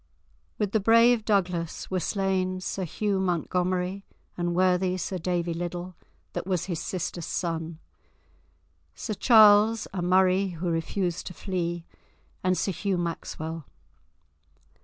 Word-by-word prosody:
With 205 - -1
the 220 - +2
brave 230 +2 +5
Douglas 180 -6 -1
were 185 - +1
slain 185 -1 -1
Sir 185 0 -3
Hugh 200 +3 -1
Montgomery, 180 +1 -1 0.3
and 175 -1 -1
worthy 185 0 +2
Sir 185 0 -3
Davy 175 0 -1
Liddle, 175 +1 -5 0.4
that - - -4
was 185 -4 0
his 175 -4 -3
sister's 175 -2 -4
son; 165 -2 -3 1.2
Sir 215 - -4
Charles, 215 0 +6
a 185 - -2
Murray 185 +2 +3
who 175 +1 -1
refused 175 +2 -2
to 180 - -7
flee, 175 -3 -3 0.6
and 185 0 +2
Sir 195 - 0
Hugh 195 +1 -1
Maxwell. 165 -2 -4
185 Hz, 125 wpm, -27 LUFS, 175-195 Hz, 1.2 s, Charles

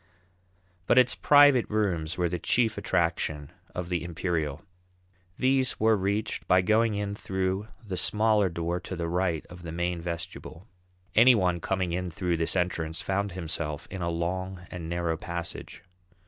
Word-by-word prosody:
But - - +4
its 125 -1 +6
"private 145 -4 +5
rooms" 90 -6 -1
were 90 -1 +1
the 90 +1 -3
chief 115 +5 +2
attraction 80 -5 -1 0.2
of 90 -1 -4
the 85 -3 -1
Imperial. 85 -2 -2 0.7
These 130 -1 +2
were 110 0 +4
reached 100 +2 -2
by 90 0 +4
going 110 +2 +3
in 100 0 -2
through 95 0 -2 0.2
the 95 -3 -4
smaller 105 0 +2
door 85 +1 -2
to 95 - -6
the 85 -1 -3
right 85 -2 -1
of 90 0 -12
the 85 -1 -7
main 85 +1 -2
vestibule. 85 +2 -6 0.5
Any 125 +3 +7
one 90 -4 +1
coming 95 +1 -1
in 90 +1 -2
through 85 0 -1
this 80 +2 0
entrance 85 -3 -1
found 100 0 -1
himself 80 -4 -4
in 95 - -5
a 85 - -1
long 90 +2 -3
and 85 -2 -6
narrow 85 -1 -1
passage. 85 -2 -6
90 Hz, 160 wpm, -28 LUFS, 85-100 Hz, 0.7 s, Any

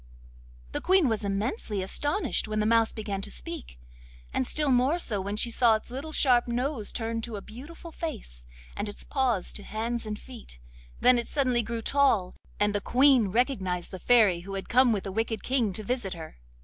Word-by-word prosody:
The - - -3
Queen 375 -5 +4
was 220 -2 -1
immensely 205 - -2
astonished 290 - 0
when 215 0 -2
the 210 - +1
Mouse 225 0 +3
began 205 -3 -4
to - - -6
speak, - - -7 0.5
and 130 - 0
still 300 -3 +1
more 255 +6 +3
so 215 - -1
when 200 +2 -3
she 235 +2 +2
saw 230 -1 +4
its 215 - -6
little 280 +5 -6
sharp 250 -5 +3
nose 245 -1 -2
turn 230 0 -3
to 225 -1 -6
a 200 - -5
beautiful 310 +9 -11
face, - - -7 0.3
and 205 +1 -3
its 205 - -7
paws 250 -9 0
to - - -5
hands 225 +2 -3
and 210 0 -3
feet; 230 - -11 0.4
then 250 -1 +6
it 235 - -4
suddenly 255 -4 +1
grew 230 0 -4
tall, 265 -11 +2 0.2
and 205 0 +2
the 205 - -1
Queen 255 -1 +4
recognised 190 -5 -1
the 185 - -7
Fairy 215 -5 +4
who 195 +3 -7
had 195 - -6
come 250 0 +5
with 205 -3 0
the 195 - -5
wicked 225 +2 -2
King 250 -6 +1
to 215 - -4
visit 210 -4 -2
her. 160 - -10
225 Hz, 200 wpm, -28 LUFS, 200-255 Hz, 0.5 s, then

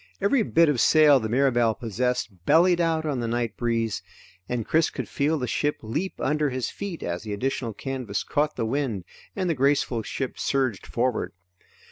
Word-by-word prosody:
Every 205 +6 +3
bit 170 -5 +4
of 140 -6 +2
sail 150 -3 +6
the 110 -2 -3
Mirabelle 120 -3 +2
possessed 115 -4 -2
bellied 175 +1 +5
out 160 -1 +1
on 145 -4 -1
the 120 - -2
night 115 -1 -1
breeze, 115 -3 -1 0.5
and 120 -3 -2
Chris 160 0 +2
could - - -5
feel 150 +3 0
the 125 - -2
ship 145 +4 0
leap 150 - -3
under 150 0 +1
his 130 -2 -3
feet 200 -5 -6
as 85 0 -3
the 105 -1 -5
additional 120 +1 -2
canvas 125 -5 -3
caught 150 +1 0
the 115 - -1
wind 120 -6 -1 0.3
and 185 -2 -1
the 170 - +2
graceful 135 -4 +1
ship 130 +3 -4
surged 130 -8 -1
forward. 125 0 -1
130 Hz, 180 wpm, -25 LUFS, 115-150 Hz, 0.5 s, sail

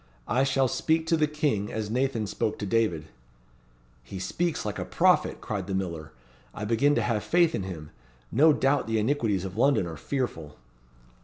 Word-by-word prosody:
I 125 +5 +2
shall 135 -1 +2
speak 160 +5 0
to 165 - +2
the 155 -1 +2
King 145 -9 -1
as 110 -1 -4
Nathan 125 -2 0
spoke 105 +1 -2
to 105 - -4
David." 100 -7 0 1.0
"He 65 +10 -9
speaks 155 - -2
like 105 - -3
a - - -2
prophet," - - +2
cried - - -4
the 95 - -2
miller; 85 -5 -4 0.4
"I 105 - -4
begin 120 +7 +2
to - - +1
have 110 -3 -1
faith 170 -2 +3
in - - -1
him. 85 -5 -7 0.4
No 155 +6 +5
doubt 140 -2 +1
the 115 0 0
iniquities 110 -5 0
of 95 +2 -7
London 135 -5 +3
are 80 -2 -7
fearful." 80 - -4
115 Hz, 180 wpm, -27 LUFS, 95-140 Hz, 1.0 s, No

